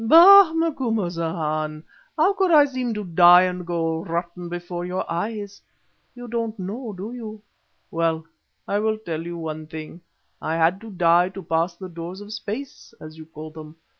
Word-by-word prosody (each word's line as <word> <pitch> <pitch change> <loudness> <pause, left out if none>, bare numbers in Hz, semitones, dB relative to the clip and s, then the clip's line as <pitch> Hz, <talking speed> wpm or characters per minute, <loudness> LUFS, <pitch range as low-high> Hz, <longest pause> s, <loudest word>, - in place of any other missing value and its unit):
"Bah! 345 - +9
Macumazahn. 170 - -2 0.3
How 345 +6 +4
could 385 -2 +1
I 300 -3 +7
seem 255 -3 -3
to 210 - -3
die 175 0 +7
and 180 -1 -3
go 165 -1 -1
rotten 170 +1 -4
before 175 0 -5
your 180 +1 -3
eyes? 205 +3 -4 0.5
You 245 0 -9
don't 230 -1 -3
know, 215 +5 -5
do 200 +4 -7
you? 220 -3 -8 0.5
Well, 165 -1 0 0.4
I 200 - 0
will 220 0 0
tell 165 -7 -5
you 170 +1 -6
one 155 -1 -6
thing. 160 +2 -9 0.4
I 160 - -2
had 165 +4 +2
to 225 - -10
die 175 -2 +3
to 195 0 -9
pass 165 +2 0
the 185 +2 -8
doors 170 +2 -8
of 205 +1 -9
space, 225 +3 -7
as 155 0 -10
you 160 - -11
call 155 -1 -9
them. 155 0 -11
180 Hz, 170 wpm, -23 LUFS, 165-220 Hz, 0.5 s, Bah